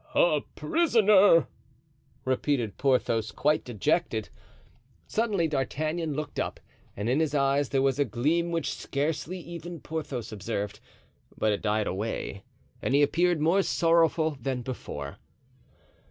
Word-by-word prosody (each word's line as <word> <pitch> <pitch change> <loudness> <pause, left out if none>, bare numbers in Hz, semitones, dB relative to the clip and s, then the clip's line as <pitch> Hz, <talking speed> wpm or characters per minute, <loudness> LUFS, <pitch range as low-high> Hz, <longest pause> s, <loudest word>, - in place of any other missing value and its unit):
"A - - +4
prisoner," 210 - +5 0.8
repeated 130 -4 0
Porthos, 115 -5 +1
quite 150 +8 +1
dejected. 120 - -1 0.8
Suddenly 210 -7 0
D'Artagnan 155 +2 -2
looked 150 0 -4
up - - -3 0.4
and 105 +2 -2
in 130 +5 +2
his 155 -2 0
eyes 140 0 +2
there 135 -1 +1
was 135 0 +1
a - - +5
gleam 155 +9 0
which 165 -3 -1
scarcely 155 +5 -2
even 170 0 -8
Porthos 145 -8 -5
observed; 105 -1 -4 0.6
but 110 - +2
it 100 - -3
died 105 0 +1
away 100 0 -4 0.4
and 135 - +1
he 145 - +5
appeared 170 +3 +2
more 170 +6 +4
sorrowful 165 -4 +2
than 125 0 -2
before. 75 - -6
145 Hz, 125 wpm, -28 LUFS, 120-165 Hz, 0.8 s, prisoner